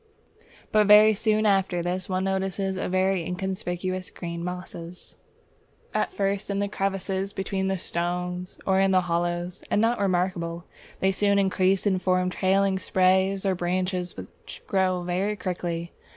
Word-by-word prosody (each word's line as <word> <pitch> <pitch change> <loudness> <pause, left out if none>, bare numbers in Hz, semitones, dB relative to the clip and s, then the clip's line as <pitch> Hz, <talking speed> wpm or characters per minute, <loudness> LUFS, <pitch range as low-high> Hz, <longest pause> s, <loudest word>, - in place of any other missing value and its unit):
But 210 -1 +4
very 210 +1 +8
soon 215 +1 +1
after 190 -4 +2
this, 180 +2 -2
one 185 0 0
notices 190 0 -1
a 185 - -3
few 185 - 0
inconspicuous 185 0 -2
green 170 -1 -6
mosses; 180 -1 -7 0.8
at - - 0
first 200 0 -1
in 200 0 0
crevices 195 0 -2
between 195 0 -2
the 190 0 0
stones 180 +1 -3
or 190 0 +3
in 195 0 +3
hollows, 175 0 0
and - - +2
not 230 +2 +2
remarkable, 175 -3 -1 0.4
they 190 - +3
soon 200 +1 +2
increase 190 0 +2
and 190 -3 +1
form 185 0 +1
trailing 190 +1 +2
sprays 190 +1 +2
or 190 - +2
branches 180 0 -2
which 95 -1 -11
grow 185 -2 +1
very 185 +4 -1
quickly. 175 -3 -4
185 Hz, 140 wpm, -26 LUFS, 180-195 Hz, 0.8 s, very